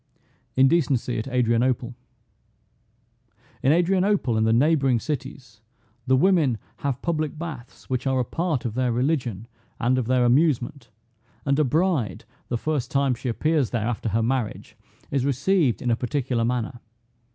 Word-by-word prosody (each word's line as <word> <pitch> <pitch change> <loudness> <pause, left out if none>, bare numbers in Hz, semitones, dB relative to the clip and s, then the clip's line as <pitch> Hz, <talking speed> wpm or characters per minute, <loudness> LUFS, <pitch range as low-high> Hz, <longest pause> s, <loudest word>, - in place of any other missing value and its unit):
INDECENCY 135 -4 +2
AT 110 - -5
ADRIANOPLE. 125 0 +1 1.7
In 135 - +3
Adrianople 180 - +2
and 110 0 +2
the - - +3
neighboring 135 0 +3
cities, 130 -5 -6 0.5
the 130 - +4
women 150 - +3 0.2
have 140 -2 -3
public 155 -3 -1
baths, 150 -7 -8
which 130 +1 -2
are 130 -1 +1
a 125 - 0
part 160 -3 -2
of 115 - -2
their 125 0 0
religion 120 - -1 0.3
and 125 +2 +2
of 120 - -3
their 125 -1 +3
amusement, 130 -2 +1 0.6
and 140 +1 +2
a - - +5
bride, 150 - 0 0.2
the 120 - 0
first 140 -1 -2
time 140 -3 +2
she 125 +1 -4
appears 150 +2 +1
there, 115 -3 -1
after 115 -1 -2
her 110 +2 +1
marriage, 120 -2 -2 0.4
is 135 -2 +1
received 140 - +1
in 120 - +1
a - - +3
particular 125 -1 -1
manner. 120 0 -2
130 Hz, 150 wpm, -24 LUFS, 120-150 Hz, 1.7 s, a